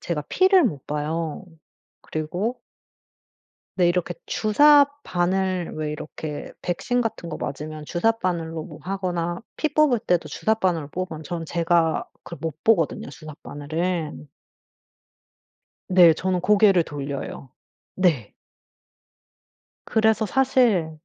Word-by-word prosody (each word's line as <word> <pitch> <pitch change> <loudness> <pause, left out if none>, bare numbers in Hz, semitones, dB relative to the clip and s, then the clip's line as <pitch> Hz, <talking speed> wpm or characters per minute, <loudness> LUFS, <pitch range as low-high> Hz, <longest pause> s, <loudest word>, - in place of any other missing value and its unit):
제가 155 -4 -3
피를 375 -1 +5
못 145 - -2
봐요. 155 +3 -3 0.6
그리고 180 +10 -3 1.2
네 180 -2 +4
이렇게 175 0 0
주삿바늘 205 - +3
왜 155 -1 -2
이렇게 150 0 -7
백신 245 +8 -1
같은 215 -7 -3
거 - - -5
맞으면 150 +1 -6
주삿바늘로 175 -5 -1
뭐 - - -11
하거나 180 -3 -2 0.2
피 310 -2 -1
뽑을 295 -6 +4
때도 180 -4 0
주삿바늘로 185 -9 0
뽑으면 160 -1 -5
저는 165 +1 -5
제가 165 0 +1 0.2
그걸 170 - -9
못 160 -3 -5
보거든요, 180 -10 +2
주삿바늘을. 155 +2 -4 1.6
네 180 -3 +7
저는 185 +2 -1
고개를 200 -1 +5
돌려요. 140 -2 -6 0.4
네. 160 - +1 1.5
그래서 220 0 +2
사실 245 -10 +2
175 Hz, 235 characters per minute, -24 LUFS, 155-210 Hz, 1.6 s, 네